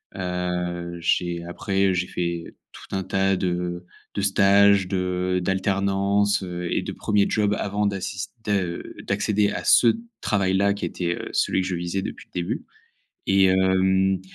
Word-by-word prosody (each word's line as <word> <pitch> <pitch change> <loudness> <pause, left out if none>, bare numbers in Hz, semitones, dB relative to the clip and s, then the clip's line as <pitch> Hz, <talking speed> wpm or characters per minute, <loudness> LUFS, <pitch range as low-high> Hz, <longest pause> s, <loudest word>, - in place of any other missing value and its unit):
Heu, 90 -1 -3
j'ai 85 0 0
après, 95 +2 0
j'ai 90 - 0
fait 85 -2 -4 0.2
tout - - -9
un 95 - 0
tas 95 +1 +1
de 90 -1 -2 0.3
de - - -2
stages, 100 0 +5
de 90 0 -1
d'alternances, 100 +1 +1
heu, 90 -1 -4
et - - 0
de - - -5
1ers 105 -1 +1
jobs 105 -1 +1
avant 105 +1 -1
d'assis 100 0 -3 0.2
de, 105 - -1
heu, 90 -4 -2
d'accéder 105 -1 +1
à - - -4
ce 120 - +6 0.3
travail-là, 100 -1 +1
qui 100 - -4
était, 85 -1 -2
heu, - - -7
celui - - +1
que 90 - -3
je 95 - -2
visais 85 +3 -3
depuis - - -7
le - - -43
début, 85 - -3 0.7
et 95 0 +5
hem, 95 0 +3
95 Hz, 160 wpm, -24 LUFS, 90-100 Hz, 0.7 s, ce